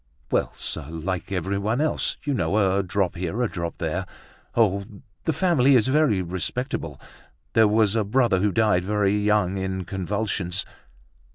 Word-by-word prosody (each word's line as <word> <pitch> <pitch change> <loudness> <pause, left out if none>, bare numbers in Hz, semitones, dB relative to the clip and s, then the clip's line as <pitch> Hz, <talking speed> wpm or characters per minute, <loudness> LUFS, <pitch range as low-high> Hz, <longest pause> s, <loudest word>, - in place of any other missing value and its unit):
"Well! - - +1
sir, - - -3
like 85 +4 -4
everyone 100 - -1
else, 155 +1 0
you 145 - -1
know; 95 -4 0 0.2
a 100 - +2
drop 95 -1 -1
here, 95 +7 -2
a - - +2
drop 85 -5 -5
there. - - -2 0.5
Oh! 100 -4 +3 0.4
the 160 - +2
family 150 -5 +3
is 125 +1 +3
very 135 -10 +3
respectable! 90 - -3 0.5
There 110 -1 +5
was 105 0 +3
a 110 - +2
brother 110 -2 +2
who 100 +2 +2
died 105 -3 +2
very 105 0 +1
young 105 -2 +1
in 95 -1 -3
convulsions." 95 -1 -2
100 Hz, 155 wpm, -24 LUFS, 95-115 Hz, 0.5 s, There